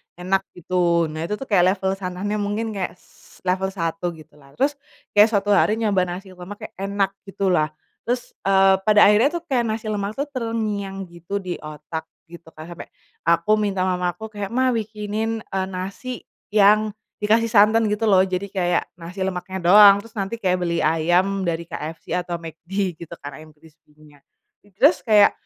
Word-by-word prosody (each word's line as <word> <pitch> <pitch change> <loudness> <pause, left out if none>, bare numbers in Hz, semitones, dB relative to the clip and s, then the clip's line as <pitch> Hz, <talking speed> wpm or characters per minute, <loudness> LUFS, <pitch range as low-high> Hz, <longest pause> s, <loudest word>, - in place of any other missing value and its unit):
enak 185 +2 0 0.2
gitu 170 -2 +1
nah 155 +2 -4
itu 210 - -2
tuh 270 - -7
kayak 185 -1 +4
level 190 -1 -1
sananya 195 +3 -3
mungkin 210 +2 -2
kayak 190 -4 -4
s 180 - -22
level 190 +1 0
1 165 -1 -3
gitulah 150 -3 -18
terus, 280 +2 0 0.3
kayak 210 +1 +7
suatu 205 -1 +1
hari 205 +1 +4
nyoba 205 -5 +1
nasi 185 +2 -7
lemak 185 +3 -10
kayak - - -9
enak 195 0 0 0.2
gitulah, 185 -5 +1 0.4
terus, 245 +1 -2 0.2
eee, 195 0 +5
pada 210 -1 +6
akhirnya 215 +7 +5
tuh 345 - -4
kayak 255 -7 0
nasi 220 0 -3
lemak 205 0 -3
tuh 280 +2 -2
terngiang 215 -5 -3
gitu 170 +3 -7
di 180 -1 -4
otak 155 +1 -7 0.2
gitu 170 -1 -13
kan 155 - -9
sampe, 170 - -9 0.4
aku 170 +4 +3
minta 195 -3 0
mama 180 -2 0
aku 220 +4 -9
kayak, 205 -1 -4
"Ma 255 +4 +1
bikinin," 220 0 -3
eee, 190 -1 -3
"nasi 195 +7 -6 0.3
yang 210 +1 +4 0.2
dikasih 220 +2 +2
santan" 215 +1 +5
gitu 210 +2 -1
loh 195 -3 +5
jadi 185 +1 -2
kayak 175 -3 +1 0.2
nasi 180 +3 -5
lemaknya 190 0 -4
doang 200 -1 +9
terus 230 - -15
nanti 195 +1 -2
kayak 185 -3 +1
beli 170 -2 -1
ayam 175 +5 +2
dari 170 0 -1
KFC 160 -1 -7
atau 180 -1 -2
McD 170 +2 -4
gitu 170 0 -9
kan 145 +1 -7
ayam 155 0 -13
krispinya, 150 -1 -21 0.6
terus 185 -1 +5
kayak 210 0 +6
195 Hz, 175 wpm, -22 LUFS, 175-210 Hz, 0.6 s, doang